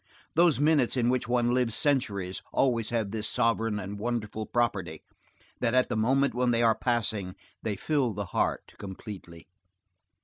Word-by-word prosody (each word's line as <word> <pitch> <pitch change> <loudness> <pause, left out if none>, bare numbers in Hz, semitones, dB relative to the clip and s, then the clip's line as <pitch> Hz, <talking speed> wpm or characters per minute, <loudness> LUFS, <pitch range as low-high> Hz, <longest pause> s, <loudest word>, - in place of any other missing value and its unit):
Those 165 -4 +4
minutes 145 -4 +3
in 120 -1 +2
which 125 -2 0
one 120 0 +2
lives 125 -3 +1
centuries 105 -10 0
always 115 -4 +1
have 110 -4 -1
this 110 -1 -2
sovereign 115 -3 +1
and 100 +1 -5
wonderful 110 -1 -3
property, 95 -10 -1 0.6
that 120 0 +1
at 130 - +3
the 120 - -1
moment 130 +5 +2
when 125 +1 +1
they 120 0 +2
are 115 -1 +5
passing 110 -6 -1 0.3
they 105 -2 -2
fill 135 +3 0
the 105 0 -4
heart - - -1
completely. 95 -4 -9
115 Hz, 160 wpm, -28 LUFS, 105-125 Hz, 0.6 s, are